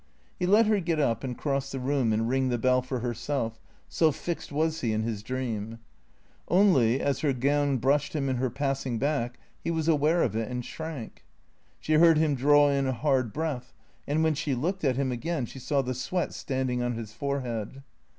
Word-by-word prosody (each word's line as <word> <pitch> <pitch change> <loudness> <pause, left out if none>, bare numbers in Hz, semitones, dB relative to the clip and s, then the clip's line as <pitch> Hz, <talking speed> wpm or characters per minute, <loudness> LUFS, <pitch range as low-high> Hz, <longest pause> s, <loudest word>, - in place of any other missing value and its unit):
He 180 - 0
let 210 +4 +6
her 210 -1 +3
get 165 -3 -1
up 120 -5 +1
and 125 -2 -4
cross 140 -2 -1
the 135 - -4
room 130 -3 +1
and 110 +1 +1
ring 130 +1 +1
the 120 - 0
bell 125 +2 +3
for 130 -1 -4
herself, 120 -1 -2 0.3
so 160 -2 +2
fixed 170 +3 -5
was 160 +2 0
he 115 -3 0
in 110 0 0
his 110 -3 -3
dream. 115 -2 -4 0.7
Only, 145 - +4
as 140 -2 0
her 145 -3 +1
gown 140 +2 +1
brushed 140 +4 +1
him 140 -2 0
in 130 -1 0
her 130 +1 0
passing 135 -1 -2
back, 125 -2 -1 0.3
he - - -2
was 160 -1 -1
aware 160 +2 +3
of 110 - -1
it 110 -1 -2
and 125 -1 -4
shrank. 160 -8 -7 0.6
She 155 - -1
heard 165 0 +6
him 155 -1 +2
draw 145 +2 +5
in 140 -1 +1
a 130 - 0
hard 130 -2 +1
breath, 145 -4 -4 0.3
and 155 +3 +1
when 160 -1 +3
she 140 -2 -1
looked 180 +9 -2
at 130 -4 +2
him 135 -2 0
again 130 +3 -2
she 135 - -10
saw 135 +2 0
the 130 0 -2
sweat 145 +9 -2
standing 130 -2 -2
on 120 0 -1
his 110 -2 -7
forehead. 130 -1 -4
135 Hz, 205 wpm, -27 LUFS, 125-150 Hz, 0.7 s, let